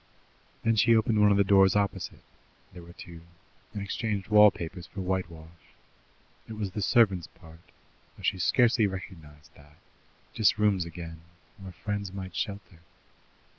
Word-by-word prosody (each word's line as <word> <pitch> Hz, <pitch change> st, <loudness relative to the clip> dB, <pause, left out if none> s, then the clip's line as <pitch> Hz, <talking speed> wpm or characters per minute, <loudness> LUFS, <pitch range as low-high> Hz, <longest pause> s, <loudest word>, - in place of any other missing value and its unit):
Then 115 Hz, 0 st, +2 dB
she 115 Hz, +2 st, +4 dB
opened 110 Hz, -1 st, +2 dB
one 105 Hz, -, +6 dB
of 100 Hz, -, +3 dB
the 100 Hz, -, +4 dB
doors 95 Hz, -1 st, +4 dB
opposite 100 Hz, -1 st, -2 dB, 0.5 s
there 90 Hz, -, -11 dB
were 85 Hz, 0 st, -14 dB
two 85 Hz, -2 st, -12 dB, 0.5 s
and 105 Hz, -3 st, -5 dB
exchanged 100 Hz, -1 st, -3 dB
wall 105 Hz, 0 st, +7 dB
papers 85 Hz, -1 st, -8 dB
for -, -, -10 dB
whitewash. 85 Hz, -3 st, -6 dB, 0.7 s
It 110 Hz, -, -8 dB
was 105 Hz, -3 st, -4 dB
the 105 Hz, -, -5 dB
servants' 100 Hz, -5 st, +2 dB
part, 80 Hz, 0 st, -17 dB, 0.6 s
though -, -, -14 dB
she 95 Hz, -, 0 dB
scarcely 115 Hz, +2 st, +3 dB
realized 80 Hz, -6 st, -10 dB
that: 75 Hz, +1 st, -20 dB, 0.6 s
just 110 Hz, -1 st, +2 dB
rooms 105 Hz, -4 st, +1 dB
again, 80 Hz, -1 st, -9 dB, 0.4 s
where 95 Hz, -1 st, -9 dB
friends 100 Hz, +1 st, -5 dB
might 95 Hz, -3 st, -8 dB
shelter. 100 Hz, -3 st, -5 dB
95 Hz, 150 wpm, -27 LUFS, 85-105 Hz, 0.7 s, wall